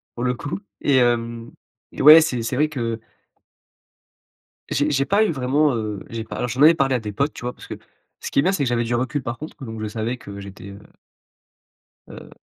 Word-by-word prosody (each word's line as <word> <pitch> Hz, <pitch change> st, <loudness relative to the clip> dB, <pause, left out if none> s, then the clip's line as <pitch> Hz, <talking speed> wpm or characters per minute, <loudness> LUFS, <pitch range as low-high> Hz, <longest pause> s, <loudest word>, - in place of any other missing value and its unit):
pour 120 Hz, -, -4 dB
le 125 Hz, -, +1 dB
coup, 145 Hz, +8 st, -5 dB, 0.2 s
et 140 Hz, -, +2 dB
hem, 115 Hz, -1 st, 0 dB, 0.4 s
et -, -, -6 dB
ouais, 155 Hz, +3 st, +10 dB
c'est 125 Hz, -7 st, -1 dB
c'est 115 Hz, +3 st, -3 dB
vrai 150 Hz, +3 st, +2 dB
que 115 Hz, -6 st, -3 dB, 1.7 s
j'ai 145 Hz, +1 st, +1 dB
j'ai 140 Hz, -1 st, +1 dB
pas 205 Hz, +7 st, +3 dB
eu 210 Hz, -, 0 dB
vraiment, 140 Hz, 0 st, +1 dB
heu, 105 Hz, -3 st, -4 dB
j'ai 115 Hz, -1 st, -5 dB
pas -, -, -8 dB
alors 125 Hz, -, -2 dB
j'en 125 Hz, +5 st, -1 dB
avais 160 Hz, +2 st, +8 dB
parlé 135 Hz, -3 st, +1 dB
à 125 Hz, -, 0 dB
des 105 Hz, -2 st, -6 dB
potes, 140 Hz, +8 st, -1 dB
tu -, -, -10 dB
vois? 125 Hz, -, -3 dB
Parce -, -, -14 dB
que, -, -, -6 dB, 0.5 s
ce -, -, -6 dB
qui -, -, -1 dB
est 140 Hz, -, +6 dB
bien, 185 Hz, -, +2 dB
c'est 170 Hz, -7 st, 0 dB
que 130 Hz, -, 0 dB
j'avais 120 Hz, -1 st, 0 dB
du 120 Hz, +1 st, -2 dB
recul 130 Hz, +4 st, -1 dB
par 120 Hz, -1 st, -4 dB
contre, 155 Hz, -2 st, -10 dB
donc 110 Hz, -2 st, -7 dB
je 110 Hz, -, -2 dB
savais 110 Hz, +3 st, -3 dB
que 100 Hz, -5 st, -10 dB
j'étais, 100 Hz, 0 st, -10 dB
heu 100 Hz, -, -11 dB, 1.3 s
heu -, -, -12 dB
125 Hz, 230 wpm, -22 LUFS, 115-145 Hz, 1.7 s, ouais